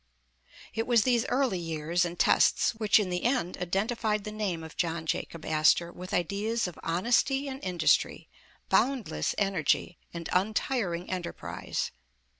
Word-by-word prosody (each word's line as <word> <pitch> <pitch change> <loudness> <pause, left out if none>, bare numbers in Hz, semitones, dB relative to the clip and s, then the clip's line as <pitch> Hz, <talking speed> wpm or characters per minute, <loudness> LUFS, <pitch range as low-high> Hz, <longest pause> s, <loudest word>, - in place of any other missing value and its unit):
It 225 0 -2
was 235 -4 +4
these 245 -2 +2
early 250 -8 +1
years 165 +1 -1
and 175 0 -5
tests, - - +4
which 220 -2 +3
in 200 -4 0
the 180 0 -2
end, 240 -8 0
identified 210 +4 -1
the 210 - -5
name 200 -6 -3
of 160 - -10
John 165 -2 -1
Jacob 160 0 -3
Astor 155 +2 +3
with 180 +1 -9
ideas 200 +6 0
of 175 - -9
honesty 240 +10 +1
and 270 0 -6
industry, 175 -4 +1 0.4
boundless 240 - +1
energy 185 -3 0
and 170 -1 -6
untiring 190 -2 0
enterprise. 180 -2 -4
185 Hz, 140 wpm, -29 LUFS, 170-225 Hz, 0.4 s, was